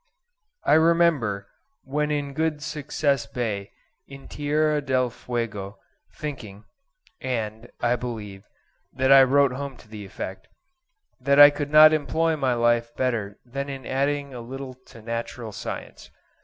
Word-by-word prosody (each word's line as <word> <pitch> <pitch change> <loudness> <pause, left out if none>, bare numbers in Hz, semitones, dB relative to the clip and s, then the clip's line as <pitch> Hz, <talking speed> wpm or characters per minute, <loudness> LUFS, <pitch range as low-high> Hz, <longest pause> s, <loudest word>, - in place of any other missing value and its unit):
I - - +3
remember 160 -11 +3 0.4
when 150 +2 -1
in 145 -2 -2
Good 155 0 -1
Success 145 -4 -1
Bay, 105 -5 -3 0.4
in 140 0 -12
Tierra 150 +1 0
del 130 -3 0
Fuego, 115 -5 -5 0.4
thinking 115 -9 -7 0.6
(and, 115 -3 -4
I 120 0 +2
believe, 105 -5 -7 0.5
that 130 +1 +1
I 135 0 +10
wrote 140 +1 +4
home 135 0 -6
to - - -18
the 105 -1 -9
effect) 95 0 -7 0.7
that 140 0 +3
I 145 0 +11
could 145 -1 -4
not 155 +1 +8
employ 160 +2 +1
my 130 -5 0
life 120 0 +1
better 110 -6 -2
than 140 +3 -5
in 135 -1 -7
adding 140 +1 -1
a 120 - -7
little 130 +2 -7
to 115 - -14
Natural 115 0 -5
Science. 100 - -7
130 Hz, 140 wpm, -24 LUFS, 115-145 Hz, 0.7 s, I